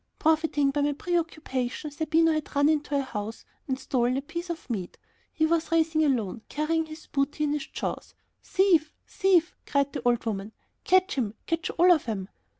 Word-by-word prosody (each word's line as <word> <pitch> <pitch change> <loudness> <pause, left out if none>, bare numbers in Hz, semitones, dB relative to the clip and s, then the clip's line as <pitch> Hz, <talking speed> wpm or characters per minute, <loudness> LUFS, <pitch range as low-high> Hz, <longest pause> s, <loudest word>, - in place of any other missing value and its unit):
Profiting 310 -3 +2
by 290 +1 0
my 290 0 +2
preoccupation, 305 -5 -2
Zerbino 320 +2 +2
had 310 -1 -3
run 285 +1 +4
into 295 -2 +1
a 275 - +1
house 220 -3 -6 0.2
and 260 -2 -1
stolen 250 -1 0
a - - -1
piece 340 +4 -6
of 335 -2 -5
meat. 200 -8 -4 0.3
He 315 - +1
was 330 0 0
racing 320 -1 +3
alone, 235 -7 0
carrying 320 +2 0
his 310 +1 -10
booty 280 +2 -1
in 295 - +1
his 295 -2 -3
jaws. - - -5 0.3
"Thief! 365 -5 +2
thief!" 375 -5 +2
cried 280 -1 +1
the - - -3
old 240 -1 +2
woman; 210 -1 -3 0.3
"catch 370 0 +4
him! 220 -3 -2
Catch 330 0 -1
all 355 +2 +6
of 310 -8 +3
'em!" 195 -3 -3
300 Hz, 180 wpm, -27 LUFS, 260-325 Hz, 0.3 s, all